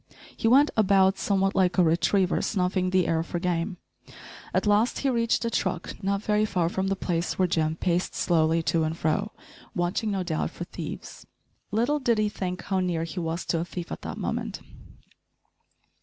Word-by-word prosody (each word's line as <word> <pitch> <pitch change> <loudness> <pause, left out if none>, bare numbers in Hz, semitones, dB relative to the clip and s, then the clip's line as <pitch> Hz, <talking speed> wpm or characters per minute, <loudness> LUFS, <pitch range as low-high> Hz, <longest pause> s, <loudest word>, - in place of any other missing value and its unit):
He - - 0
went 275 +5 +5
about 195 -2 +4
somewhat 195 -1 +1
like 185 -1 +2
a 180 - +6
retriever 175 +3 +2
snuffing 185 -2 0
the 185 -1 +2
air 160 -1 +1
for 170 - -4
game. 175 +2 -1 0.7
At - - 0
last 210 +3 +3
he 270 - +3
reached 230 -1 +1
a 230 - -1
truck, 185 -5 -2
not 200 +1 0
very 210 -1 +2
far 180 -5 0
from 190 +1 -1
the 195 - +1
place 175 -2 -2
where 185 - +3
Jim 160 -2 0
paced 175 +1 -1
slowly 165 -1 +2
to 165 0 +1
and 160 +1 -2
fro, 185 +8 0 0.4
watching, 175 +5 0
no 195 -2 -1
doubt, 160 -3 -1
for - - -7
thieves. - - -8 0.4
Little 240 +8 +1
did 240 -4 +2
he 215 0 +2
think 185 -3 -4
how 190 -1 0
near 175 -3 0
he 165 +3 -5
was 165 +1 -3
to 165 - 0
a - - -1
thief 175 -1 -7
at - - -5
that - - -6
moment! - - -3
185 Hz, 185 wpm, -26 LUFS, 170-205 Hz, 0.7 s, a